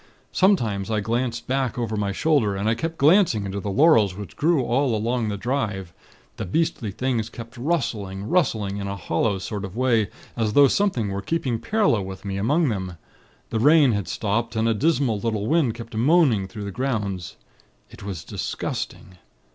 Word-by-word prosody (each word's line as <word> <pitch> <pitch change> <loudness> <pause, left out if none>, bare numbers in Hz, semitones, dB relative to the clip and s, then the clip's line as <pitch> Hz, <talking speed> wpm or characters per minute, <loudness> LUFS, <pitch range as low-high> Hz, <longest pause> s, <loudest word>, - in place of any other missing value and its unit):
Sometimes, 115 - +2
I 110 -1 +1
glanced 115 +2 -2
back 130 -2 -1
over 115 -3 -2
my 100 -1 -1
shoulder; 115 -4 +1
and 100 +2 -2
I 110 - +3
kept 165 +8 -4
glancing 150 - +4
into 100 +1 -4
the 100 - -4
laurels 110 - +4
which 100 -4 -8
grew 155 -3 +2
all 125 0 +1
along 115 +1 -1
the 100 - -3
drive. 100 -6 -2 0.4
The - - -3
beastly 145 - -1
things 115 +1 -2
kept 115 +2 -10
rustling, 115 - -2
rustling 110 - +1
in 100 -1 -4
a 100 - -3
hollow 95 +3 0
sort 100 +1 -5
of 95 +2 -7
way, 115 -6 +2 0.3
as 110 -3 -1
though 140 +2 +7
something 130 - 0
were 100 0 -3
keeping 130 -3 -1
parallel 200 - +1
with 95 +1 -8
me, 95 -1 -3
among 145 - +2
them. 95 -5 -4 0.5
The 115 - 0
rain 145 +1 +6
had 100 -3 -2
stopped, 115 +2 -2
and 110 +1 +1
a 115 - +3
dismal 135 -3 +1
little 110 -2 -2
wind 145 -5 +2
kept 115 0 -9
moaning 125 - +3
through 105 +2 -8
the 100 - -4
grounds. 105 -7 -3 0.6
It - - -13
was 95 -5 -6
disgusting. 90 -1 -5
115 Hz, 180 wpm, -23 LUFS, 100-135 Hz, 0.6 s, though